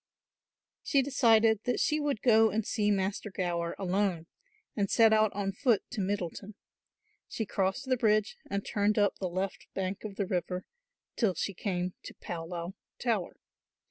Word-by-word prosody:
She 275 -1 +2
decided 225 -5 +4
that 245 - 0
she 305 0 +2
would 290 -6 -1
go 225 -2 +6
and 215 +1 -1
see 210 -3 0
Master 200 +1 -1
Gower 175 -3 -2
alone 190 -3 0 0.5
and 200 -2 0
set 225 -2 +5
out 215 -1 +4
on 195 -1 -1
foot 225 +1 +2
to 215 - -2
Middleton. 195 +1 -3 0.7
She 220 - -3
crossed 195 +7 -1
the 260 -1 +1
bridge 215 -2 +2
and 200 0 -2
turned 205 +1 +1
up 205 -1 +3
to - - -26
the 185 - -2
left 185 +2 -3
bank 190 0 -3
of 210 -2 -6
the 200 - -1
river 180 -1 -2 0.5
till 205 -7 +1
she 200 - -2
came 180 -1 -2
to - - -10
Pawlaw 170 +1 -5 0.3
Tower. 220 -8 -1
200 Hz, 165 wpm, -30 LUFS, 185-220 Hz, 0.7 s, go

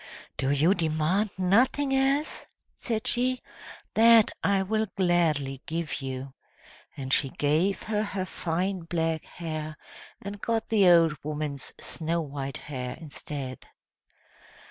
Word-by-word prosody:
"Do 135 - -1
you 150 +6 +4
demand 165 +4 +1
nothing 245 +9 +3
else?" 275 +3 0 0.3
said 225 -2 -2
she. 255 +1 +1 0.5
"That 225 -1 +6
I 195 -1 +3
will 215 +3 0
gladly 155 -7 +1
give 165 -2 -3
you!" 130 0 -5 0.6
And 135 -1 -2
she 135 - +3
gave 155 +9 +1
her 210 -1 -1
her 200 -3 -2
fine 185 +2 -2
black 165 -1 -1
hair, 155 -2 -6 0.4
and 200 0 -7
got 225 -1 -1
the 205 -5 +5
old 165 -3 +6
woman's 150 -2 -3
snow 165 +1 -2
white 140 -3 -4
hair 125 -3 -6
instead. 140 -4 -7
170 Hz, 120 wpm, -27 LUFS, 150-205 Hz, 0.6 s, That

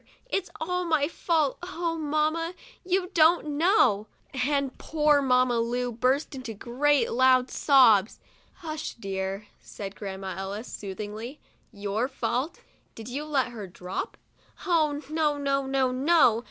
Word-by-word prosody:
It's 390 -6 -2
all 360 +3 -1
my 315 -4 +1
fault; 320 -4 0
oh, 345 -2 -3
mamma, 315 +2 -1 0.3
you 370 0 0
don't 325 -1 +4
know!" 290 - +3 0.3
and 275 0 0
poor 300 -2 +2
Mamma 250 -2 +3
Lu 245 +1 -1
burst 255 +7 0
into 250 -5 -6
great 275 +7 +1
loud 255 +1 +4
sobs. 235 -8 +4 0.5
"Hush, 310 -1 -5
dear," 195 -1 -4
said 200 -1 -8
Grandma 190 -2 -6
Ellis, 200 +4 -5
soothingly, 210 +6 -6 0.2
" - - -39
Your 215 +5 0
fault? 270 +3 -3 0.3
Did 225 +1 -9
you 285 +4 -4
let 275 -4 0
her 220 -5 -7
drop 180 +1 -6 0.2
?" - - -18
'Oh, 310 -5 +1
no, 310 -2 +1
no, 275 -1 0
no! 265 -1 +1
270 Hz, 135 wpm, -27 LUFS, 230-310 Hz, 0.5 s, don't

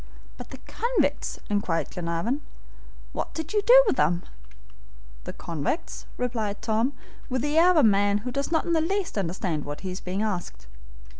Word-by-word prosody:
"But - - -10
the - - -9
convicts?" 475 +1 0
inquired 205 -5 0
Glenarvan. 175 - -2 0.7
"What - - -4
did 320 +3 -4
you 420 - +3
do - - +8
with 410 - +1
them?" 175 +1 +2 1.0
"The - - -4
convicts?" 165 - -4
replied 225 -5 -2
Tom, 225 +5 +1 0.4
with 255 -1 -1
the 295 +1 0
air 350 +2 +6
of 365 - +4
a 300 - +6
man 205 -1 +4
who 250 - -2
does 280 +4 -2
not 320 - +2
in 340 - 0
the 320 - +3
least 385 +3 -1
understand 175 -5 -2
what 145 0 -6
he 190 - -4
is 180 - -6
being 190 +3 -2
asked. 175 - -3
220 Hz, 175 wpm, -26 LUFS, -, 1.0 s, do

